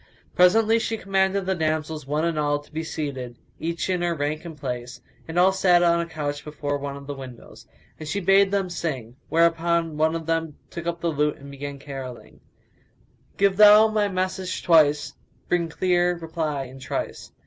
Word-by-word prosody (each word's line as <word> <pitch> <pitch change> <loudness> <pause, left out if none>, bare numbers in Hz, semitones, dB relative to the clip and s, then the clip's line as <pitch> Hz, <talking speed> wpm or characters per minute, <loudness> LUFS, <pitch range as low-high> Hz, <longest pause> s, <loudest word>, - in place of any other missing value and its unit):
Presently 220 +5 +5
she 225 0 -2
commanded 195 0 0
the 190 - +1
damsels, 155 -3 -2
one 150 +3 0
and 165 -2 -1
all, 145 -1 +1
to 145 - -15
be 160 +1 -3
seated, 135 -7 -5 0.2
each 165 +1 -2
in 180 -2 0
her 175 -1 0
rank 150 +1 -2
and 165 -3 -8
place, 125 -2 -5 0.3
and 165 +1 -5
all 185 +2 +6
sat 180 -2 +4
on 170 0 +4
a 170 - -2
couch 145 -3 -4
before 145 -1 -3
one 140 0 -5
of 140 - -11
the 145 - -5
windows, 130 -3 -11 0.3
and 155 -1 -7
she 200 - -1
bade 195 +1 +4
them 195 -1 0
sing; 135 -10 -4
whereupon 165 -1 +2
one 160 +1 +2
of 165 -1 -4
them 165 -2 -2
took 170 -1 -6
up 170 0 -3
the 170 - 0
lute 150 0 0
and 140 0 -11
began 140 0 -6
caroling, 135 -3 -9 1.0
"Give 195 -1 +3
thou 210 +1 +8
my 215 -1 +1
message 185 -1 -3
twice 150 -4 +4 0.2
* - - -37
Bring 170 -2 +1
clear 175 +1 +1
reply 160 -4 -3
in 130 +1 -11
trice! 130 - -5
165 Hz, 190 wpm, -24 LUFS, 145-180 Hz, 1.0 s, thou